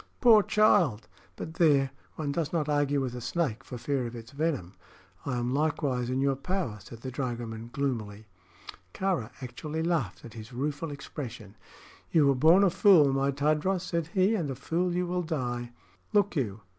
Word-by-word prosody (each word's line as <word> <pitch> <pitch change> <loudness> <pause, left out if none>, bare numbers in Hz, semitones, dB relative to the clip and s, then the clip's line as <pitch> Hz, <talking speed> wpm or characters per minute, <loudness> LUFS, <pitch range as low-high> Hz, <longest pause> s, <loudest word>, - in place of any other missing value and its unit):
"Poor 230 -4 +7
child! 175 - +3 0.3
But 160 - -7
there 145 -5 +3 0.2
one 150 -3 -2
does 155 0 -2
not 155 -3 0
argue 145 -1 +1
with 130 -3 -2
a 125 - -6
snake 135 -1 -2
for 125 - -7
fear 130 0 -1
of 120 - -8
its 115 0 -10
venom. 140 - -2 0.5
I 125 -3 -1
am 120 +1 -1
likewise 140 -4 0
in 130 +1 0
your 135 0 +2
power," 140 - -3
said 115 +4 -12
the 130 - -5
dragoman, 120 -3 -4
gloomily. 110 -7 -3 0.7
Kāra 180 - -1
actually 150 +6 -4
laughed 155 - -1
at 115 - -10
his 115 +1 -10
rueful 145 +5 -2
expression. 140 -3 -8 0.5
"You 155 -3 +4
were 140 - +5
born 160 +9 +5
a 195 - +4
fool, 165 -9 +6
my 135 +1 +1
Tadros," 155 +6 +1
said 170 -3 -2
he, 190 +3 +4
"and 170 -10 -1
a 135 - -3
fool 170 +7 -1
you 180 0 0
will 180 +1 -1
die. 120 -7 -3 0.4
Look 205 -2 +3
you! 110 -8 -2
140 Hz, 180 wpm, -28 LUFS, 120-165 Hz, 0.7 s, Poor